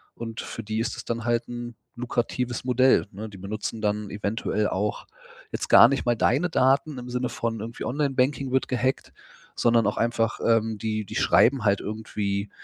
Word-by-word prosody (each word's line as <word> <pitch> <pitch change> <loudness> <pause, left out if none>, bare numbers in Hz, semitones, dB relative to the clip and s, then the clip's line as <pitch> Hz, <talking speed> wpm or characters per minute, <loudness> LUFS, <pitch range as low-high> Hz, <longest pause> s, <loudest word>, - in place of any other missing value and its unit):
und 115 -1 -6
für 115 - -7
die 110 +1 -3
ist 115 +1 -2
es - - -8
dann 115 -1 -3
halt 120 0 0
'n 120 -1 -6 0.2
lukratives 120 0 -2
Modell, 130 +1 +4
ne? 110 +3 -7
Die 100 - -12
benutzen 105 +3 -5
dann 105 -1 -1
eventuell 105 0 -1
auch 105 +2 -2 0.5
jetzt - - -4
gar 115 - +9
nicht 135 +1 -1
mal 120 - +3
deine 140 +10 +2
Daten, 135 +1 +2
im 125 0 -7
Sinne 125 0 -1
von 115 -1 -3
irgendwie 115 +2 -6
Online-Banking 135 -1 0
wird 130 0 +1
gehackt. 130 +1 -1 0.4
Sondern 115 -1 +3
auch 105 - 0
einfach, 115 -1 0
ähm, 110 -2 +2
die 110 -1 -2
die - - -9
schreiben 130 -1 +4
halt 100 -2 +3
irgendwie 105 -1 -3
115 Hz, 180 wpm, -25 LUFS, 110-125 Hz, 0.5 s, gar